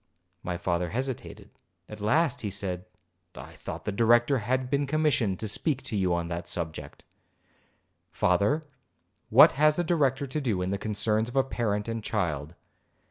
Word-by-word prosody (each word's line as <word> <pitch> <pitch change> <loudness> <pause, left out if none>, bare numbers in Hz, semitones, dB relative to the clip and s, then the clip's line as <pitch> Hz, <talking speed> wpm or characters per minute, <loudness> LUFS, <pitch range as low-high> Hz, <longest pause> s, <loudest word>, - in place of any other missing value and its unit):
My 90 -1 -3
father 85 0 -1
hesitated; 130 +3 -5 0.4
at 105 -1 -10
last 145 +10 +1
he 105 - -2
said, 95 -2 -3 0.5
'I - - -10
thought - - -8
the - - -1
Director 120 +5 +3
had 130 +4 -1
been 140 +2 0
commissioned 135 - +1
to 110 - -3
speak 135 +6 0
to - - -4
you 95 -3 +1
on 85 -1 0
that 85 0 -5
subject.' 80 -2 -5 1.1
'Father, 100 - +1 0.6
what 120 +6 +8
has 150 +2 +3
a 175 - +1
Director 145 -5 +1
to 145 +3 -3
do 105 -9 -1
in 90 - -2
the 100 - -2
concerns 110 +2 0
of 120 - -10
a 135 - +4
parent 110 -5 -2
and 115 -1 -4
child? 85 - -2
110 Hz, 165 wpm, -27 LUFS, 95-135 Hz, 1.1 s, what